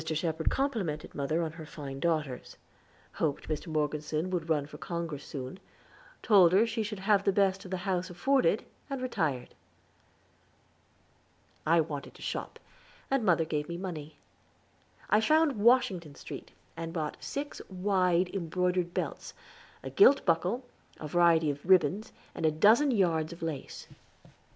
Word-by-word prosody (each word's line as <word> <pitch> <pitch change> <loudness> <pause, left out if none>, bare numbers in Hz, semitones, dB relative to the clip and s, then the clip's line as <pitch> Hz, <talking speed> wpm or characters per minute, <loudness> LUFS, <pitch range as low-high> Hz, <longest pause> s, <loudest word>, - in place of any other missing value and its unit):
Shepherd 160 0 -1
complimented 215 - -2
mother 155 +4 -1
on 160 - -3
her 160 0 -10
fine 140 -3 -7
daughters; 155 -5 -2 0.6
hoped 150 -3 -2
Mr. 155 +2 -3
Morgeson 155 +2 -1
would 170 -3 -2
run 150 -3 +1
for 145 - -12
Congress 165 -4 -4
soon 135 +6 -7 0.6
told 185 -5 +6
her 205 +4 +5
she 230 0 -2
should 210 -1 -4
have 200 +1 +2
the 200 - +3
best 195 -1 +1
the 185 - -2
house 185 -1 -2
afforded, 260 +10 +2 0.2
and 275 -1 -3
retired. 160 - -2 2.1
I 165 +1 +5
wanted 150 -3 -6
to - - -12
shop, - - -4 0.5
and 270 -3 +2
mother 170 -5 +3
gave 150 -1 -3
me 170 - -4
money. 160 -5 -6 0.9
I 210 - +4
found 305 +2 +3
Washington 200 - +3
Street, - - -9 0.3
and 165 0 -5
bought 155 -4 -3
six 290 +1 -5
wide, 185 -2 +1
embroidered 180 -1 -1
belts, - - -4 0.5
a - - -6
gilt 285 -9 +6
buckle, 185 +8 +1 0.3
a 155 - -5
variety 165 -1 +4
of 145 0 -8
ribbons, 185 +3 +3 0.2
and - - -6
a 160 - +5
dozen 220 - +5
yards 170 -8 +1
of 170 - -10
lace. 155 -5 -5
175 Hz, 145 wpm, -30 LUFS, 155-200 Hz, 2.1 s, told